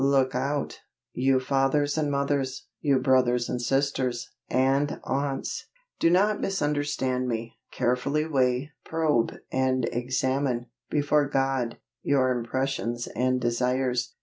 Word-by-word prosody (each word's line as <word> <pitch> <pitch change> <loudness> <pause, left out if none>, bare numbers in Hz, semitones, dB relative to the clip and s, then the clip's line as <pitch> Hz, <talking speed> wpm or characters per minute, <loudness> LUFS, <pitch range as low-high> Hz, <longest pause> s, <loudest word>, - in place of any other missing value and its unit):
Look 135 -1 +3
out, 140 +3 -2 0.3
you 130 +1 +3
fathers 135 +2 +1
and 155 -2 0
mothers, 140 -1 -1
you 140 -3 +3
brothers 125 -2 +3
and 125 - -2
sisters, 130 -1 0 0.2
and 135 +3 +2
aunts!_ 135 0 -2 0.3
Do 165 - +4
not 200 +4 +3
misunderstand 145 -7 0
me. 115 -1 -4
Carefully 140 +5 0
weigh, 135 -1 +1
probe, 155 -7 +1 0.2
and 130 -1 +1
examine, 130 0 0 0.2
before 145 -1 +2
God, 135 -3 0 0.2
your 130 -2 +2
impressions 120 -1 -2
and 130 +1 +1
desires. 125 +1 0
130 Hz, 115 wpm, -27 LUFS, 125-140 Hz, 0.3 s, Do